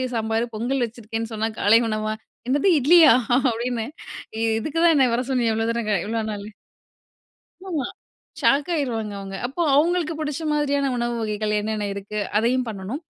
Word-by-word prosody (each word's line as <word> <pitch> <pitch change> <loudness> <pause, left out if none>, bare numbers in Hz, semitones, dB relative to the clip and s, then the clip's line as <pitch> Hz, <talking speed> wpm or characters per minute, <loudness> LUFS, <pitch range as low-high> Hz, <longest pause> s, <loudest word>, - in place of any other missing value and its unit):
சாம்பார், 225 +1 0
பொங்கல் 245 +4 -1
வச்சிருக்கேன்னு" 225 0 -6
சொன்னா 220 0 -1
காலை 215 +3 +5
உணவா, 215 0 -1 0.4
"என்னது 285 +8 +3
இட்லியா! 325 +5 +7 0.4
அப்டின்னு 235 0 -2 0.7
இதுக்கு 310 +7 -3
தான் 335 0 +5
என்னய 260 -4 +4
வர 250 - -1
சொன்னியா? 240 -3 +2
இவ்ளோ 225 0 0
தூரம், 230 -2 -2
க 210 - +3
இவ்ளோ 225 0 -1
நாளு?" 205 0 -7 1.2
ஆமா. 295 -7 -1 0.6
ஷாக் 285 +4 +3
ஆயிருவாங்க 230 -9 -2
அவங்க. 195 0 -7
அப்போ 275 +7 -4
அவங்களுக்கு 330 +2 +2
பிடிச்ச 300 0 -3
மாரியான 285 -2 +1
உணவு 240 0 -1
வகைகள் 215 -1 -2
என்னென்ன 210 0 -2
இருக்கு, 200 +1 -5 0.2
அதையும் 250 +3 +1
பண்ணணும். 210 - -5
235 Hz, 150 wpm, -23 LUFS, 215-280 Hz, 1.2 s, இட்லியா